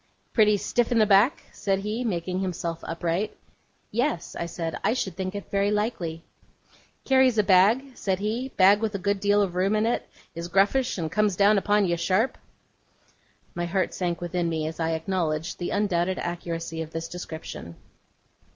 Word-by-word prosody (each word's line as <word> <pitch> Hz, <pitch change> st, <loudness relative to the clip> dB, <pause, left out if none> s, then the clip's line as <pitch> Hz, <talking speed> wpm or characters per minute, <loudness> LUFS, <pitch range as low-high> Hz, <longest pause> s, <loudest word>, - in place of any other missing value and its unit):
'Pretty 210 Hz, -2 st, +5 dB
stiff 240 Hz, +4 st, 0 dB
in 240 Hz, -, +3 dB
the 220 Hz, -, +5 dB
back?' 210 Hz, +6 st, +4 dB
said 195 Hz, -2 st, -1 dB
he, 210 Hz, +5 st, -3 dB
making 180 Hz, -4 st, -2 dB
himself 170 Hz, -3 st, -3 dB
upright. 170 Hz, +5 st, -2 dB, 0.5 s
'Yes,' 235 Hz, -, -1 dB
I 170 Hz, -, -3 dB
said. 165 Hz, -1 st, -4 dB
'I 215 Hz, -, +3 dB
should 190 Hz, -8 st, -2 dB
think 185 Hz, +1 st, -4 dB
it 200 Hz, -, -7 dB
very 200 Hz, 0 st, +2 dB
likely.' 200 Hz, -6 st, -2 dB, 0.8 s
'Carries 260 Hz, -3 st, +4 dB
a 210 Hz, -, +5 dB
bag?' 215 Hz, +8 st, +4 dB
said 190 Hz, -2 st, -1 dB
he 220 Hz, +6 st, -2 dB
'bag 200 Hz, -2 st, +5 dB
with 220 Hz, -2 st, -2 dB
a -, -, +1 dB
good 200 Hz, +1 st, 0 dB
deal 205 Hz, +1 st, +3 dB
of 185 Hz, -3 st, -3 dB
room 190 Hz, +4 st, +1 dB
in 215 Hz, +1 st, +2 dB
it 235 Hz, -, -1 dB, 0.2 s
is 170 Hz, 0 st, -5 dB
gruffish, 200 Hz, +9 st, +2 dB
and 160 Hz, -3 st, -3 dB
comes 210 Hz, -1 st, +2 dB
down 200 Hz, +2 st, +5 dB
upon 205 Hz, +1 st, +2 dB
you, 170 Hz, -1 st, 0 dB
sharp?' 190 Hz, +8 st, +1 dB, 1.1 s
My 175 Hz, 0 st, -2 dB
heart 185 Hz, +2 st, 0 dB
sank 175 Hz, -2 st, -2 dB
within 175 Hz, 0 st, -1 dB
me 160 Hz, -1 st, -2 dB
as 160 Hz, +2 st, -5 dB
I 165 Hz, 0 st, 0 dB
acknowledged 160 Hz, -1 st, -2 dB
the 175 Hz, -, -2 dB
undoubted 190 Hz, -3 st, 0 dB
accuracy 165 Hz, -1 st, -4 dB
of 160 Hz, -, -5 dB
this 165 Hz, 0 st, -4 dB
description. 160 Hz, -, -8 dB
190 Hz, 180 wpm, -26 LUFS, 170-210 Hz, 1.1 s, Pretty